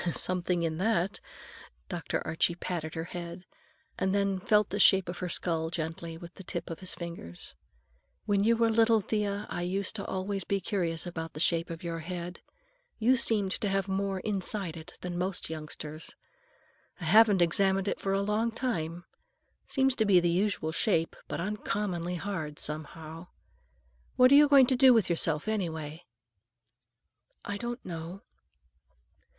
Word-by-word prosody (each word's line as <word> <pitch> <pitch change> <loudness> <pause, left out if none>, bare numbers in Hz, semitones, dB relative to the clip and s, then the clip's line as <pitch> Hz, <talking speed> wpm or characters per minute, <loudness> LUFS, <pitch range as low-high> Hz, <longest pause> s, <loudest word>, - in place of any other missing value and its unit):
"Something 180 -1 0
in 160 0 -1
that!" 195 -2 +1 0.7
Dr. - - -3
Archie 160 +2 +1
patted 170 -3 -4
her 160 - -2
head, 175 +1 -7 0.5
and 190 +1 +1
then 200 -1 +1
felt 210 +2 +3
the 205 - -2
shape 190 -2 +6
of 175 0 -5
her 180 - -3
skull 165 -2 -1
gently, 165 0 -4
with 170 +1 -11
the 195 - -11
tips 170 -1 -5
of 165 - -6
his 185 - -3
fingers. 170 - -7 0.7
"When 200 -2 +2
you 230 +2 +4
were 230 0 +3
little, 225 0 +4
Thea, 205 0 -2
I - - -4
used 195 +4 0
always 195 0 -3
to - - -6
be 200 - +1
curious 175 -4 -2
about 165 -2 -5
the 155 - -7
shape 170 +1 +2
of 165 0 -7
your 165 -1 -3
head. 175 +1 -6 0.6
You 240 +4 +4
seemed 210 -5 +2
to 205 - +1
have 195 0 0
more 195 0 -1
inside 195 -4 -1
it 160 -1 -11
than 175 -1 -4
most 185 -2 -2
youngsters. 155 0 -6 0.8
I 175 - -6
haven't 205 +1 +6
examined 190 +3 +2
it - - -1
for 195 - -1
a 195 - +2
long 210 +3 +1
time. 175 -8 -3 0.6
Seems 265 -1 +2
to 220 - +3
be 195 -3 +6
the 175 0 +1
usual 180 -3 0
shape, 165 -2 +1
but - - -4
uncommonly 185 -2 -2
hard, 165 -5 -4
some 155 +1 +1
how. 160 +2 -10 0.9
What 255 +1 +6
are - - +9
you 295 +1 +8
going 280 -2 +7
to 260 - +1
do 255 -1 +7
with 215 -6 +2
yourself, 165 0 +2
anyway?" 165 -6 -3 1.4
"I 205 - -3
don't 240 +3 -5
know." 170 +2 -7
185 Hz, 165 wpm, -29 LUFS, 165-205 Hz, 1.4 s, are